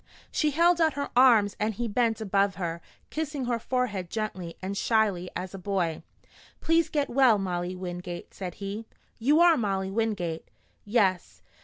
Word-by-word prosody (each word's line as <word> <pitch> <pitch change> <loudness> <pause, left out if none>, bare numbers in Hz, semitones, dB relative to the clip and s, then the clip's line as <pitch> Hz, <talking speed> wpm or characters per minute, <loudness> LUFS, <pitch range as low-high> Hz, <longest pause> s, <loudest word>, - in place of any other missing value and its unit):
'" - - -23
She 305 - +1
held 340 +3 +3
out 320 -1 +3
her 285 0 -4
arms 230 -6 +5
and 215 0 -1
he 240 +3 -2
bent 225 0 +1
above 200 -2 +1
her, 170 -2 -4 0.3
kissing 300 -4 -3
her 240 -1 0
forehead 220 -8 -2
gently 185 -6 -4
and 190 +1 -4
shyly 200 -5 +1
as 185 +1 -5
a 195 - -7
boy. 180 -4 -1 0.6
"Please 330 0 +2
get 290 -2 0
well, 250 -4 +4
Molly 180 -2 -3
Wingate," 180 -1 -6
said 180 -3 -6
he. 205 +3 -6 0.3
"You 290 +8 +4
are 345 -1 +7
Molly 195 -3 -1
Wingate?" 195 -7 -2 0.4
"Yes. 200 -5 0
205 Hz, 165 wpm, -27 LUFS, 185-250 Hz, 0.6 s, are